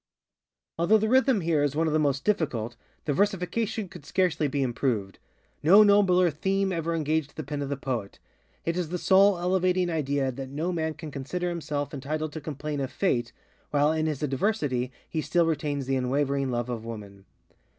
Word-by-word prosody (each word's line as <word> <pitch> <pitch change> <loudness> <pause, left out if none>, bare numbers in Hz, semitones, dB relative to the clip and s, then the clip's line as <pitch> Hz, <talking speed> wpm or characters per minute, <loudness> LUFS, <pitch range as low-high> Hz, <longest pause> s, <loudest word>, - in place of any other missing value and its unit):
_ - - -65 0.8
Although 195 +6 +5
the 220 +1 0
rhythm 260 -3 +4
here 160 -3 +1
is 145 -1 0
one 160 +2 +2
of 155 - 0
the 155 - +3
most 140 -2 +1
difficult, 130 - 0 0.3
the 145 - +1
versification 205 +4 0
could 160 - -12
scarcely 160 -1 +1
be 140 0 -1
improved. 120 -6 -1 0.4
No 195 +8 +8
nobler 190 -4 +4
_theme 195 +5 0
_ever 165 -2 -1
engaged 155 -1 -1
the 155 - -5
pen 145 +1 -4
of 140 0 -3
poet. 115 -7 -3 0.5
It 165 - 0
is 175 -3 -2
the 180 - -2
soul 195 +2 +5
elevating 180 0 +1
idea 140 -4 0
that 135 +1 -7
no 155 +6 -2
man 160 -2 -2
can 160 -2 -8
consider 175 +7 -3
himself 150 -4 -3
entitled 150 +2 -3
to 160 - -6
complain 150 0 -4
of 135 -2 -3
Fate 120 -11 0 0.4
while 145 +1 +3
in 160 0 0
his 150 -1 -3
adversity 135 - 0 0.2
he 160 - -2
still 170 +2 +2
retains 145 -4 -1
the 135 +1 0
unwavering 135 +1 0
love 120 -1 -1
of 120 -3 -4
woman. 100 -4 -9
155 Hz, 185 wpm, -27 LUFS, 135-180 Hz, 0.8 s, No